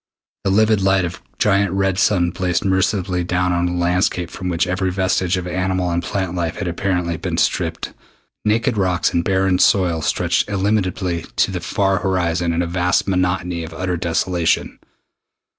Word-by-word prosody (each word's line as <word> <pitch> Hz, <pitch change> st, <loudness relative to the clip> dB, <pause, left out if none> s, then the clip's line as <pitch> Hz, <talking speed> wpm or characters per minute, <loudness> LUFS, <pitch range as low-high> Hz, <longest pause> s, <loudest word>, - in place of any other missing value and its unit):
The -, -, 0 dB
livid 110 Hz, +1 st, +3 dB
light 95 Hz, -1 st, +3 dB
of 85 Hz, +1 st, -5 dB
a -, -, -29 dB
giant 100 Hz, -2 st, +2 dB
red 95 Hz, -1 st, 0 dB
sun 90 Hz, -5 st, +2 dB
blazed 90 Hz, +2 st, -1 dB
mercilessly 95 Hz, -1 st, +1 dB
down 90 Hz, +1 st, 0 dB
upon 90 Hz, 0 st, +1 dB
a 90 Hz, -, -3 dB
landscape 90 Hz, -1 st, 0 dB
from 90 Hz, -, -5 dB
which 85 Hz, 0 st, +1 dB
every 95 Hz, 0 st, -1 dB
vestige 95 Hz, 0 st, 0 dB
of 90 Hz, -, -4 dB
animal 90 Hz, 0 st, -1 dB
and 85 Hz, 0 st, 0 dB
plant 95 Hz, -2 st, -3 dB
life 85 Hz, -2 st, -2 dB
had 95 Hz, -, -4 dB
apparently 90 Hz, -1 st, -1 dB
been -, -, -3 dB
stripped. -, -, -1 dB, 0.5 s
Naked 110 Hz, +1 st, +1 dB
rocks 90 Hz, -3 st, +1 dB
and 85 Hz, -, +1 dB
barren 95 Hz, -1 st, +1 dB
soil 90 Hz, -5 st, +3 dB
stretched 75 Hz, -, 0 dB
illimitably 95 Hz, -3 st, -1 dB
to -, -, +2 dB
the 90 Hz, -, -3 dB
far 95 Hz, +1 st, 0 dB
horizon 90 Hz, -2 st, 0 dB
in 85 Hz, +1 st, 0 dB
a -, -, -2 dB
vast 90 Hz, +2 st, 0 dB
monotony 90 Hz, -2 st, 0 dB
of 80 Hz, -, -8 dB
utter 95 Hz, -1 st, -2 dB
desolation. 85 Hz, 0 st, 0 dB
90 Hz, 175 wpm, -20 LUFS, 90-95 Hz, 0.5 s, livid